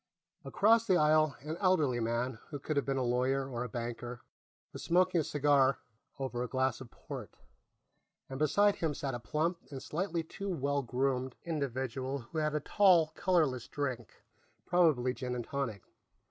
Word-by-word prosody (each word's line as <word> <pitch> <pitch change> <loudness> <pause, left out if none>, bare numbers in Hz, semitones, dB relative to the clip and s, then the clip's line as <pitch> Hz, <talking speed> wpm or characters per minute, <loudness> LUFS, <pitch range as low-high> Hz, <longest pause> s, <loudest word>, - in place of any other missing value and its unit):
Across 225 +2 +3
the 185 - +4
aisle, 155 -1 +4
an 155 +3 -5
elderly 160 -11 +2
man, 115 +1 -1
who 145 - -5
could 150 +3 -3
have 140 - 0
been 135 -1 0
a 130 - +1
lawyer 130 +2 +1
or 120 -2 -3
a 125 - -5
banker, 120 +1 -5 0.5
was - - -7
smoking 180 0 +3
a - - -2
cigar 140 -2 +3 0.4
over 130 -3 -3
a 125 - -1
glass 130 0 0
of 125 - -9
port, - - -9 0.9
and 135 0 -6
beside 200 +8 +3
him 160 -3 -1
sat 135 -2 -3
a 120 - -3
plump 160 +7 -1
and 135 -2 -6
slightly 170 +1 -2
too 195 +5 -6
well 140 -4 0
groomed 130 0 -1
individual 135 -3 -2
who 135 +5 -5
had 150 0 0
a - - +2
tall 170 -1 +4
colorless 155 -10 +1
drink, 130 -5 -5 0.4
probably 155 -9 +3
gin 125 -1 -4
and 120 -2 -4
tonic. 120 -9 -3
140 Hz, 170 wpm, -32 LUFS, 125-160 Hz, 0.9 s, the